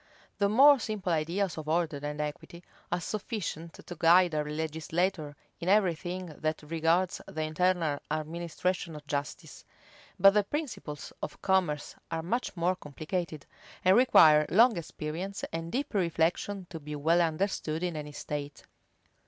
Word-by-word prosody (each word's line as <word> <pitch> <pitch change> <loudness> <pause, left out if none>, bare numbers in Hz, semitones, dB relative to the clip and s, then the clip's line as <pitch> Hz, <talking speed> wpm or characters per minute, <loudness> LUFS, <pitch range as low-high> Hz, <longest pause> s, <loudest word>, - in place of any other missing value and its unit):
The 200 -1 +3
more 275 +6 +7
simple 210 -5 -3
ideas 170 +3 -1
of 155 0 -6
order 160 -2 +1
and 150 0 -4
equity 150 +3 -5 0.3
are 175 - +1
sufficient 175 -4 -4
to 175 - -7
guide 170 +1 +5
a 150 -1 0
legislator 160 +1 -2 0.2
in 175 +1 -2
every 195 -3 +4
thing 180 +3 -5
that 155 0 -2
regards 165 +3 +1
the 155 - -3
internal 160 -2 +1
administration 170 +2 -2
of 150 -1 -10
justice: 145 -1 -5 0.6
but 195 +2 +8
the 210 0 +3
principles 215 - -5
of - - -6
commerce 180 -7 +1 0.2
are 165 -1 -3
much 230 +2 -2
more 175 +2 +1
complicated, 155 0 -5 0.4
and 185 +1 +6
require 155 -11 +6
long 225 +6 +5
experience 170 +4 -5
and 165 0 -4
deep 275 +2 -2
reflection 180 +1 0
to 165 - -6
be 150 0 -7
well 165 +4 +3
understood 165 -1 -1
in 175 -2 -2
any 150 -1 -6
state. 145 0 -6
170 Hz, 145 wpm, -29 LUFS, 155-185 Hz, 0.6 s, but